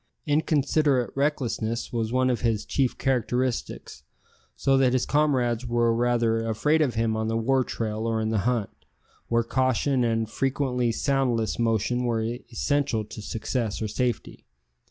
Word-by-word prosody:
Inconsiderate 145 -3 +2
recklessness 125 -6 -1
was 115 -1 -1
one 130 0 +2
of 120 - -2
his 115 -3 0
chief 135 -3 0
characteristics, 125 - -2 0.5
so 135 - +2
that 130 -2 +3
his 130 - +1
comrades 125 -5 +1
were 120 -1 +2
rather 115 -1 +1
afraid 150 +9 +2
of 135 -6 +1
him 115 -1 +1
on 110 0 -1
the 115 0 0
war 130 +3 +2
trail 110 -1 -3
or 115 -1 0
in 110 0 -1
the 110 - +1
hunt, 115 -1 0 0.6
where 115 0 +2
caution 130 +2 +1
and 115 -1 0
frequently 130 -1 0
soundless 125 -4 0
motion 115 +2 +1
were 115 -2 0 0.3
essential 135 -2 0
to 110 +1 -9
success 110 +1 -3
or 110 - -2
safety. 120 +3 -3
120 Hz, 150 wpm, -26 LUFS, 115-130 Hz, 0.6 s, that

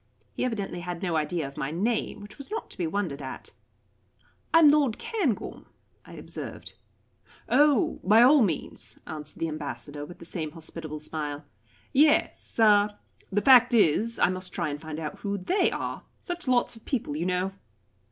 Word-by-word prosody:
He - - -2
evidently 205 -7 -2
had 175 0 -5
no 175 -3 0
idea 155 0 -1
of 140 - -12
my 135 - -2
name, 210 +5 -1
which 205 +7 -12
was 280 - -7
not 440 +2 -5
to - - -11
be 170 - 0
wondered 160 -6 -2
at. 130 -1 -7 1.0
"I - - +6
am 320 -3 +8
Lord 285 -6 +3
Cairngorm," 350 - -2 0.4
I - - -13
observed. - - -8 0.7
"Oh 290 -5 +3
by 215 +5 +6
all 280 +3 +7
means," 145 - -2
answered 155 -1 -8
the 165 - -1
Ambassador, 145 -2 -6
with 175 +4 -10
the - - -11
same 160 -3 -4
hospitable 160 -2 -6
smile. 150 -1 -4 0.5
"Yes 295 +2 +2
uh 210 -2 +5 0.4
the 205 +1 +1
fact 250 -1 +7
is, 220 +3 +3
I - - +4
must 185 -1 -4
try - - -1
and 145 +1 -5
find 155 -1 -6
out 155 -2 -5
who 200 -1 -2
they 365 - +2
are; - - -4 0.2
such 350 -4 -6
lots 245 -1 +2
of 225 - -15
people, 225 - -2
you 165 +4 -1
know." 185 +1 0
185 Hz, 175 wpm, -27 LUFS, 155-240 Hz, 1.0 s, am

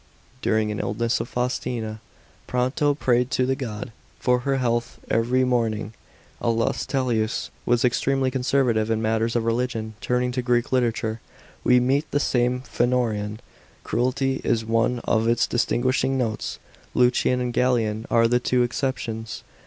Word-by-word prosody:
During 110 -1 +1
an 105 - -4
illness 115 +3 0
of - - -4
Faustina, 120 -3 -2 0.5
Pronto 130 +4 +1
prayed 125 -3 +2
to 130 - +1
the 135 +1 +1
god 115 -4 -5
> - - -32
for 125 -1 +2
her 135 +2 0
health 120 -2 -1
every 120 +3 +2
mo 120 -3 +2
niog. 105 0 -5 0.5
Aulus 115 -1 0
'Tellius 120 -5 -1 0.2
was 120 +1 +3
extremely 130 +1 +1
conservative 125 -4 +1
in 110 -1 +1
matters 110 +1 0
of 120 - +1
religion. 115 -2 -1
Turning 125 0 0
to 125 +1 -1
Greek 120 -1 +1
literature, 115 -3 0 0.4
we 125 0 +5
meet 135 +5 +1
the 145 - +1
same 125 -2 +1
phenoraen 120 -1 0
n. 105 +1 -6 0.4
Credulity 130 +3 0
is 110 -1 +1
one 115 +2 +1
of 110 0 +1
its 115 0 +3
distinguishing 130 +2 +1
notes. 115 -4 -2 0.4
Lucian 125 0 +3
and 125 -1 -2
Galen 115 -4 +1
are 115 0 +4
the 120 +1 +2
tw<> 125 0 +2
exceptions. 120 -3 -3
120 Hz, 155 wpm, -24 LUFS, 115-125 Hz, 0.5 s, we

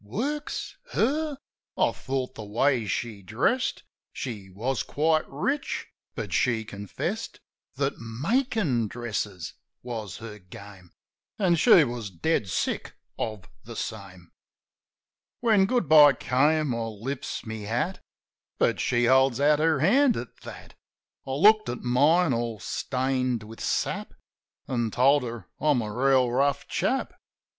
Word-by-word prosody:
Works? 275 - -4 0.2
Her? 295 +4 0 0.4
I - - +3
thought, 130 -1 -4
the 110 - -8
way 115 +2 +1
she 110 0 -3
dressed, 130 - 0 0.3
She 105 -7 -6
was 120 +7 -2
quite 155 +1 +1
rich; 275 - -2 0.3
but - - -5
she 115 -3 +1
confessed 100 -2 -5 0.4
That 140 +1 -1
makin' 145 - 0
dresses 105 -7 -4 0.3
was 110 -6 -5
her 105 -2 -9
game. 95 0 -13 0.5
An' 190 -5 +3
she 170 0 +6
was 120 -5 -4
dead 100 - -1
sick - - -2 0.2
of 110 -4 -4 0.2
the - - -9
same. 95 -5 -7 1.1
When 215 -5 +4
Good 240 - +1
bye 150 -2 +8
came, 145 +2 +1
I 115 - -2
lifts 115 +6 -5
my 110 0 -5
hat; 115 - -2 0.6
But - - +2
she 120 0 +2
holds 130 0 +4
out 150 +1 +4
her 155 -3 +2
hand 245 - +4
at 120 - -7
that. - - -11 0.5
I - - -3
looked 215 +9 +5
at 120 - -4
mine, 145 +6 +3
all 115 -2 -2
stained 130 +1 -1
with 110 +1 -11
sap. - - -2 0.5
An' 120 -3 -1
told 135 +6 +4
her 115 -7 -6
I'm 145 -6 +2
a 105 -1 -5
reel 130 0 +3
rough 140 +2 +1
chap. 265 - -1
130 Hz, 135 wpm, -26 LUFS, 110-155 Hz, 1.1 s, bye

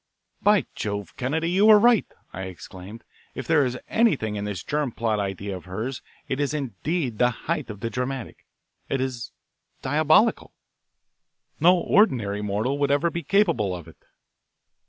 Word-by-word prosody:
"By 210 -1 +4
Jove, 100 -1 -4
Kennedy, 160 +6 -1
you 200 +4 +4
were 215 -1 +9
right," 235 +1 +4 0.3
I 95 +1 -5
exclaimed. 95 +3 -10 0.3
"If - - -5
there 160 -3 +4
is 125 -1 -2
anything 150 - +1
in 100 0 -3
this 100 -4 -4
germ 150 -3 -1
plot 110 -2 -1
idea 100 0 -3
of 90 - -10
hers 110 +8 -4 0.3
it 135 - -2
is 145 +1 0
indeed 135 - -3
the 125 - +5 0.2
height 155 -5 -2
of 105 -2 -8
the 115 - -3
dramatic 125 -1 -5 0.4
it 135 - 0
is 130 -3 -4 0.5
diabolical. 155 - +3 1.0
No 180 +2 +6
ordinary 120 - +2
mortal 105 +7 -1
would 140 -1 +1
ever 145 +4 +2
be 170 - -3
capable 160 - +2
of 85 -3 -9
it." - - -15
130 Hz, 155 wpm, -24 LUFS, 105-160 Hz, 1.0 s, were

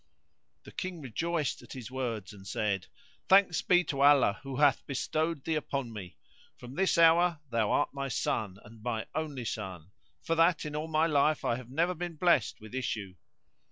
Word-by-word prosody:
The - - -12
King 185 -2 -5
rejoiced 155 +4 -2
at - - -11
his 130 -2 -8
words 115 -6 -4
and 95 -1 -13
said, 100 -4 -1 0.4
"Thanks 190 -3 +5
be 180 0 +4
to 140 -4 -3
Allah 140 -7 +5
who 135 -1 -6
hath 140 -1 +3
bestowed 155 +2 -1
thee 165 - -1
upon 140 -5 -3
me! 95 -5 -9 0.4
From 125 +1 -10
this 190 +3 +1
hour 170 0 +5
thou 115 -3 +1
art 145 - +1
my 140 -1 -3
son 105 -6 -2
and 110 +1 -14
my 115 -1 -2
only 150 -5 -3
son, 95 -6 -5 0.3
for 165 - 0
that 165 0 +3
in 150 0 -5
all 155 +1 -3
my 160 0 +2
life 150 -1 +2
I 115 - +2
have 125 -2 -10
never 165 +7 +1
been 175 -1 -5
blessed 155 -7 +2
with 110 +1 -12
issue." 110 -7 -3
140 Hz, 185 wpm, -30 LUFS, 115-165 Hz, 0.4 s, Thanks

